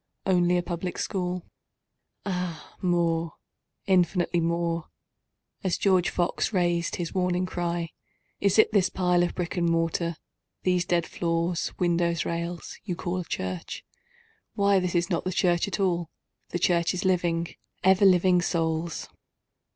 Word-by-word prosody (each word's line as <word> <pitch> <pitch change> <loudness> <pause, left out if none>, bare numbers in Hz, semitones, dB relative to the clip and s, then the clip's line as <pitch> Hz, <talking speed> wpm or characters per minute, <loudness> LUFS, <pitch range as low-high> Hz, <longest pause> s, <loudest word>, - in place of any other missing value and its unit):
Only 180 -1 +3
a 175 - 0
Public 175 +1 -4
School? 180 -2 -2 0.8
Ah 180 -5 -4
more—infinitely 175 +1 0
more;(As 170 +2 -4
George 185 -3 +3
Fox 175 +3 0
rais'd 175 -3 +1
his 170 -2 -4
warning 180 -1 +1
cry, 175 -2 -2 0.5
"Is 200 0 +2
it 220 - +6
this 200 -4 +3
pile 180 -1 +2
of 175 - 0
brick 180 0 -3
and 170 -1 +2
mortar—these 170 +2 -2
dead 170 -2 +1
floors, 170 0 -1
windows, 170 -1 +1
rails—you 170 +2 -4
call 180 +1 -3
the 180 - -4
church? 95 - -4 0.7
Why 200 -1 +4
this 180 -1 -2
is 175 +2 +1
not 170 - 0
the 185 - -2
church 175 +1 +2
at 200 - -3
all—the 175 -2 -3
Church 170 0 +2
is 180 - -3
living, 170 -2 +1 0.3
ever 190 +2 +5
living 180 -1 +5
Souls.") 165 -1 -1
175 Hz, 130 wpm, -27 LUFS, 170-180 Hz, 0.8 s, it